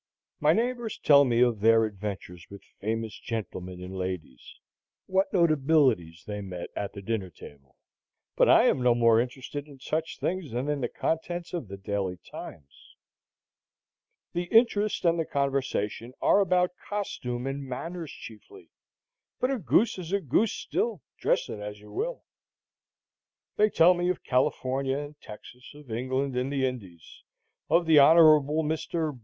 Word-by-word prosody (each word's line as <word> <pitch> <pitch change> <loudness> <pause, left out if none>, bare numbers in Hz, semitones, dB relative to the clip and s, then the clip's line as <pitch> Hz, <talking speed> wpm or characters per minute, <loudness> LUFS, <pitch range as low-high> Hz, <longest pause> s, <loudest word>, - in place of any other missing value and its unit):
My 150 +1 +4
neighbors 235 +3 -1
tell 140 -1 +6
me 120 -2 +2
of 120 -4 +3
their 115 +1 +5
adventures 100 -4 -7
with 100 0 -11 0.2
famous 110 0 -3
gentlemen 95 -5 -6
and 95 +1 -8
ladies, 90 -8 -6 0.5
what 190 +1 +1
notabilities 140 - +2
they 105 -1 -5
met 90 -3 -7
at 100 - -4
the 100 -1 -9
dinner 100 -3 -2
table; 70 -4 -15 0.6
but - - +4
I - - +7
am 130 - +2
no 125 -1 +4
more 115 -1 +4
interested 130 +3 -6
in 140 -2 -14
such 155 +4 -3
things 180 -4 -2
than 125 +4 -2
in 145 -2 -1
the 120 - 0
contents 175 +2 -3
of 170 -10 -4
the 100 +1 -8
Daily 95 -2 -3
Times. 70 -4 -12 1.4
The 175 +1 -2
interest 215 -1 +2
and 170 0 +3
the - - +2
conversation 130 -5 -2
are - - +4
about 180 -2 +2 0.2
costume 125 -12 -4
and 135 +1 -3
manners 165 +5 -6
chiefly; 115 - -13 0.7
but 255 - +1
a 265 - -1
goose 190 - +2
is 175 -1 -7
a 200 - +2
goose 195 - +1
still, 225 - -2 0.2
dress - - +1
it 105 - -6
as 105 0 -7
you 105 - -15
will. - - -3 1.3
They 210 +1 +4
tell 180 -2 +5
me 175 0 -1
of 180 - -2
California 130 +1 0
and 145 +1 -8
Texas, 125 +6 -12
of 145 -5 -13
England 130 +3 -2
and 125 +2 -1
the 135 -2 0
Indies, 95 -11 -7 0.5
of 170 +3 +3
the 160 -2 +6
Hon. 155 +4 +7 0.5
Mr. 155 -2 -2
135 Hz, 155 wpm, -27 LUFS, 105-170 Hz, 1.4 s, I